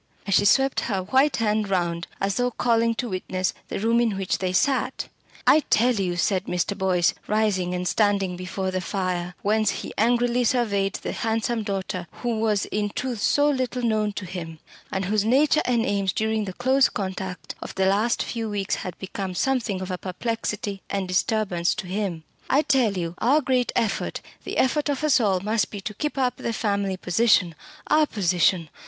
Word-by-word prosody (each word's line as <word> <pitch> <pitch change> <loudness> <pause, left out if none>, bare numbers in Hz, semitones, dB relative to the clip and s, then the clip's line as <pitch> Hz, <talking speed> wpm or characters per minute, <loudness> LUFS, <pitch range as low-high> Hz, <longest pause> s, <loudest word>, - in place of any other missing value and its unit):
And 200 - -1
she 205 - +4
swept 270 +6 +4
her 195 -3 -1
white 265 +8 +3
hand 215 -2 0
round, 170 -2 -1
as 195 0 -1
though 245 0 +2
calling 230 -1 +1
to 240 +2 -3
witness 185 -1 -2
the - - -4
room 230 +3 +2
in 225 -5 0
which 195 -1 -1
they 185 -1 -1
sat. 265 +8 0 0.4
"I 310 - +7
tell 245 +3 +4
you," 190 -5 -1
said 185 +1 +1
Mr. 180 +3 -1
Boyce, 185 -3 +2
rising 200 -4 +1
and 180 0 -2
standing 200 -3 +1
before 185 +1 -3
the 185 0 -2
fire, 180 -1 -2
whence 215 +1 +2
he - - -4
angrily 240 +2 +2
surveyed 205 -5 +1
the - - -4
handsome 225 +1 -1
daughter 190 -3 -3
who 235 -3 -2
was 215 -3 +1
in 210 0 -2
truth 245 0 -4
so 290 +6 +3
little 255 -3 -1
known 215 -2 +1
to 200 - -5
him, 170 -3 -6 0.3
and 190 0 -1
whose 210 +2 +1
nature 280 +7 +3
and 235 -2 +1
aims 195 -2 0
during 220 -1 0
the 190 - -5
close 260 +4 +3
contact 190 -1 -5
of - - -7
the 190 - +1
last 205 +5 +2
few 225 -2 -4
weeks 200 -2 -2
had 180 -2 -6
become 190 -1 -5
something 235 -6 0
of 185 0 -4
a 180 - -3
perplexity 205 0 -3
and 195 -2 -2
disturbance 185 -2 +1
to - - -5
him, 185 -3 -3 0.3
"I 285 +3 +4
tell 255 -8 +2
you 170 -1 -3
our 275 +6 +4
great 255 -4 +1
effort, 215 -4 -1 0.2
the - - -4
effort 295 +3 +2
of 285 +1 -1
us 285 -4 +4
all, 195 -5 +1
must 210 0 0
be 205 - -6
to 210 - -5
keep 300 +7 -3
up 250 -2 +1
the 230 - -3
family 200 -3 -1
position! 185 -1 +3 0.3
our 305 0 +3
position. 180 - +1
205 Hz, 190 wpm, -24 LUFS, 185-235 Hz, 0.4 s, I